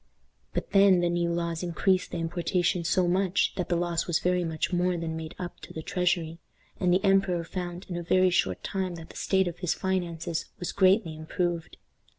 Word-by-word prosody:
But - - -3
then 195 -2 +6
the 175 0 +1
new 170 0 0
laws 170 -1 -2
increased 185 +1 +1
the - - -4
importations 170 +1 0
so 185 -2 +3
much, 185 +2 +2
that 180 - -3
the 175 - +2
loss 170 -1 -1
was 170 -2 +2
very 180 0 +1
much 160 +1 -2
more 180 0 +1
than 165 -1 -3
made 160 0 -6
up 180 -1 -6
to - - -11
the 160 - -6
treasury, 180 -3 0 0.4
and 180 -1 +2
the 185 +2 +3
emperor 195 -3 +3
found 175 +1 -5
in 180 - -5
a 175 - -2
very 185 +2 +3
short 95 - 0
time 190 -3 -2
that 165 -1 -10
the - - -17
state 190 -1 +1
of 175 0 -5
his 180 -3 0
finances 170 -3 -2
was 180 - -4
greatly 190 -3 +3
improved. 170 +1 -3
175 Hz, 200 wpm, -28 LUFS, 170-185 Hz, 0.4 s, then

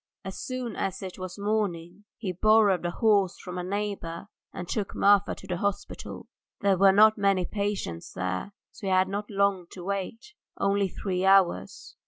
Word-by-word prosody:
As 190 - -6
soon 255 -4 -4
as 190 0 -3
it 190 0 -7
was 185 0 -6
morning 200 -3 -2
he 195 -5 -3
borrowed 205 0 +4
a - - -1
horse 200 -1 +2
from 180 0 -7
a - - -3
neighbour 200 -2 -4 0.2
and 175 - -7
took 205 0 -3
Marfa 200 0 +4
to - - -13
the 180 -2 -3
hospital. 200 +2 -4 0.4
There 200 -1 +3
were 195 +1 +6
not 215 +2 +6
many 195 -2 +2
patients 200 - -3
there, 95 0 -2
and - - -28 0.2
so 205 - -8
he - - 0
had 185 0 +4
not 205 +2 -4
long 200 -3 +1
to 180 - -9
wait, 200 - -4 0.3
only 200 0 +2
three 185 0 -3
hours. 195 -2 +2
195 Hz, 180 wpm, -27 LUFS, 185-205 Hz, 0.4 s, were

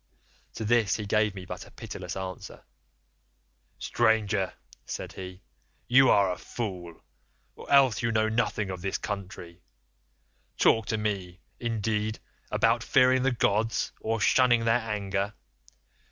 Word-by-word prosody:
"To 110 - -4
this 110 -2 +3
he 105 - -4
gave 105 0 +1
me 95 -1 -8
but - - -8
a - - -15
pitiless 90 0 -7
answer, 95 -1 -7 1.1
'Stranger,' 105 -3 +1 0.3
said - - -6
he, 95 0 -9 0.4
'you 130 +1 +6
are 100 -2 +4
a 90 - -5
fool, 90 -8 -6 0.5
or - - -10
else 135 -5 +5
you 115 -1 0
know 110 -1 +2
nothing 110 -3 -1
of 90 -2 -6
this 95 +1 -2
country. 95 -4 -7 1.0
Talk 110 -2 +3
to 110 - 0
me, 95 -4 -3 0.2
indeed, 110 -2 -1 0.3
about - - +2
fearing 130 0 +4
the 135 +1 +2
gods 115 -2 0
or 115 0 -1
shunning 120 +1 +4
their 115 +1 +3
anger? 100 -2 -2
105 Hz, 135 wpm, -27 LUFS, 95-115 Hz, 1.1 s, you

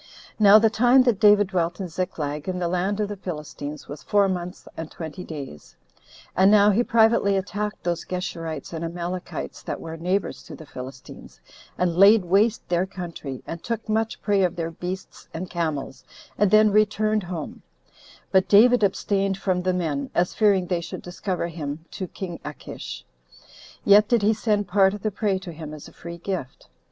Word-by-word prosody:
Now 205 0 +8
the 220 0 +4
time 245 +4 +5
that 240 -6 +2
David 205 -2 +5
dwelt 175 -1 -1
in 190 - -3
Ziklag, 160 -3 -4
in 185 - -2
the 175 -1 -1
land 185 +4 -1
of 210 - 0
the 205 - -5
Philistines, 150 -5 -7
was 145 +1 -8
four 205 -1 +3
months 180 -1 -5
and 160 -1 -6
twenty 165 +2 -7
days. 140 - -9 0.6
And 190 +2 +5
now 210 0 +6
he 210 +4 +3
privately 225 -4 +3
attacked 205 +2 -4
those 175 -1 -1
Geshurites 165 -4 -5
and 165 0 -4
Amalekites 175 +2 -5
that - - -5
were 165 0 -7
neighbors 185 +4 -1
to 155 - -9
the 155 - -12
Philistines, 130 -1 -10 0.4
and 175 -2 +1
laid 200 +2 +6
waste 210 +5 +2
their 175 +1 +1
country, 170 -8 -7
and 165 0 -6
took 230 0 -4
much 220 +1 -1
prey 205 -2 +2
of 180 -1 +1
their 165 -1 -3
beasts 180 +3 -7
and 175 +2 -5
camels, 155 -6 -3 0.3
and 205 -1 +3
then 215 +1 +5
returned 215 +1 +2
home; 175 -4 -6 0.7
but 190 -1 +3
David 240 +4 +6
abstained 195 0 +1
from 185 -2 0
the 185 +1 +1
men, 160 -6 -2
as 175 +1 +1
fearing 200 -4 +3
they 175 -1 -1
should 165 - -7
discover 180 0 -3
him 160 -1 -6
to 185 - -5
king 175 -1 -7
Achish; 65 - -8 0.8
yet 205 +1 +7
did 235 -3 +2
he 215 +2 +4
send 210 -2 0
part 195 +1 +3
of 205 - -10
the 215 - 0
prey 200 -1 0
to 185 -2 -8
him 155 -1 -8
as 150 - -11
a - - -15
free 170 0 -8
gift. 170 -7 -6
185 Hz, 185 wpm, -24 LUFS, 165-205 Hz, 0.8 s, Now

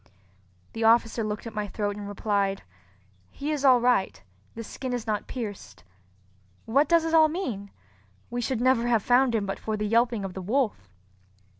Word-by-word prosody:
The 225 - -3
officer 225 0 +3
looked 215 +1 -4
at 230 - -7
my 210 -1 -3
throat 205 0 -3
and 205 -1 -7
replied, 200 -1 -1 0.7
"He 290 +2 -4
is 295 -2 -2
all 260 -3 +6
right, 240 -5 +1 0.4
the 230 - -6
skin 255 +3 -6
is 240 -2 -3
not 215 -2 -2
pierced. 205 - -7 0.8
What 275 +6 +2
does 335 -1 +4
it 325 - -2
all 315 -1 +6
mean? 245 - -4 0.6
We 245 0 -2
should 240 0 -2
never 245 -2 +3
have 230 -4 +2
found 245 -1 +3
him 210 -2 0
but 195 - -4
for 220 -1 -3
the 210 - -2
yelping 230 -1 +1
of 190 - -6
the 190 - -6
wolf." 210 - -1
225 Hz, 180 wpm, -26 LUFS, 205-250 Hz, 0.8 s, all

